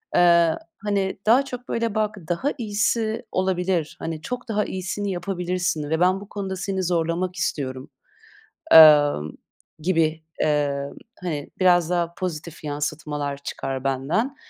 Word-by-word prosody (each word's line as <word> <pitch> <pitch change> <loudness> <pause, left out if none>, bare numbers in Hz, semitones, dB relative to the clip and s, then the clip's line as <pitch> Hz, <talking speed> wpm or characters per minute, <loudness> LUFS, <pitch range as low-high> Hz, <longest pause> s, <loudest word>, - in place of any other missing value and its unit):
eee, 170 -2 +5 0.2
hani, 200 -2 -1
daha 245 +6 +5
çok, 250 -1 -8
böyle, 230 -2 -1
"Bak, 215 -1 0
daha 205 +12 0
iyisi 220 0 -1
olabilir, 180 -3 0
hani, 160 -1 -4
çok 245 +6 -5
daha 210 -1 +1
iyisini 190 +2 -3
yapabilirsin 180 -4 -2
ve 160 +1 0
ben 185 +2 +3
bu 205 - -12
konuda 195 -2 -4
seni 190 0 -2
zorlamak 175 +1 -1
istiyorum." 130 -5 -3 0.8
emm, 145 - +8 0.5
gibi, 160 -2 +1 0.2
emm, 140 -2 0 0.3
hani, 150 -5 -4
biraz 175 -2 +4
daha 170 -1 0
pozitif 170 -3 -5
yansıtmalar 145 -1 -3
çıkar 135 -1 -4
benden. 155 - -1
175 Hz, 130 wpm, -23 LUFS, 155-200 Hz, 0.8 s, emm